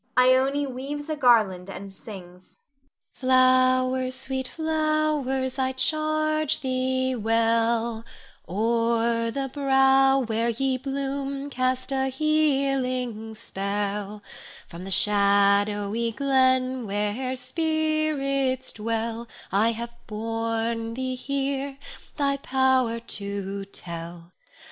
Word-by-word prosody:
_ - - +7 0.2
Ione 275 +2 +1
weaves 280 +3 -5
a - - 0
garland 215 -9 +3
and 195 +1 -8
sings. 185 -3 -12 0.6
Flowers, 255 0 +3
sweet 265 0 -3
flowers, 310 -5 0
I 260 0 0
charge 310 +1 0
thee 260 0 0
well, 230 0 +1 0.5
O'er 230 +3 +1
the 270 +3 -3
brow 270 -1 +4
where 230 -2 0
ye 260 +2 0
bloom 275 +1 -3
cast 255 +1 -1
a 265 0 +1
healing 265 -6 0
spell; 205 +1 -4 0.4
From 170 0 -10
the 190 - -7
shadowy 205 +3 +2
glen 260 -2 +2
where 210 +6 -2
spirits 275 -2 0
dwell, 230 +1 -3 0.2
I 215 +5 +3
have 235 +1 -7
borne 225 +1 -2
thee 260 0 -2
here, 275 +1 -3 0.4
thy 280 -1 +1
power 260 -3 +1
to 200 -3 -4
tell. 170 -2 -8
255 Hz, 95 wpm, -25 LUFS, 225-270 Hz, 0.6 s, _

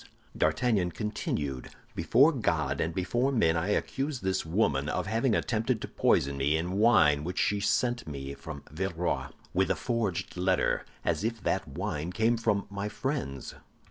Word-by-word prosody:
D'Artagnan 110 -8 +2
continued: 75 - -3 0.2
"Before 125 - +4
God 80 - 0
and 80 - 0
before 120 +10 0
men, 85 -11 +3
I 85 +3 0
accuse 135 +6 -1
this 95 0 0
woman 75 -5 +1
of - - -1
having 115 +3 +1
attempted 115 +1 0
to - - -4
poison 70 0 +2
me, 70 +3 +2
in 90 +4 -2
wine 75 -11 +5
which 90 +3 -4
she 105 - +2
sent 120 +2 0
me 70 -2 -5
from 75 0 -8
Villeroy, 85 +1 -2 0.3
with 95 0 +2
a - - +2
forged 115 -9 -2
letter, 95 0 +1 0.2
as - - 0
if 115 0 -1
that - - 0
wine 75 +4 -3
came 110 +5 +2
from 105 -3 0
my 100 +1 -3
friends. 125 - -3
95 Hz, 160 wpm, -29 LUFS, 80-115 Hz, 0.3 s, wine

